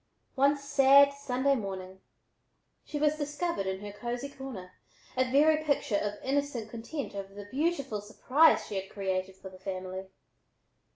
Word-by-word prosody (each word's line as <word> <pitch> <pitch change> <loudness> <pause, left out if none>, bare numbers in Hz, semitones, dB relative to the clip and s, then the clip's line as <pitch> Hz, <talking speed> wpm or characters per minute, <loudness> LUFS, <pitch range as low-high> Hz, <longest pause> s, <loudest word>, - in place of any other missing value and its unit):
One 280 +2 +3
sad 280 0 +6
Sunday 275 0 0
morning 190 -5 -5 0.8
she 300 - -5
was 300 +1 +2
discovered 295 - -2
in 190 0 -3
her 205 0 -6
cosy 240 +5 -4
corner, 255 -10 -8 0.4
a 255 0 +1
very 305 +3 +4
picture 285 -7 +1
of 205 0 -2
innocent 265 -5 -1
content 245 +5 -5
over 195 0 -7
the 205 0 -8
beautiful 275 -7 -1
surprise 270 +9 +3
she 200 - -4
had 190 - -14
created 190 -1 -2
for 190 - -10
the 185 0 -14
family. 185 0 -5
250 Hz, 150 wpm, -30 LUFS, 195-280 Hz, 0.8 s, sad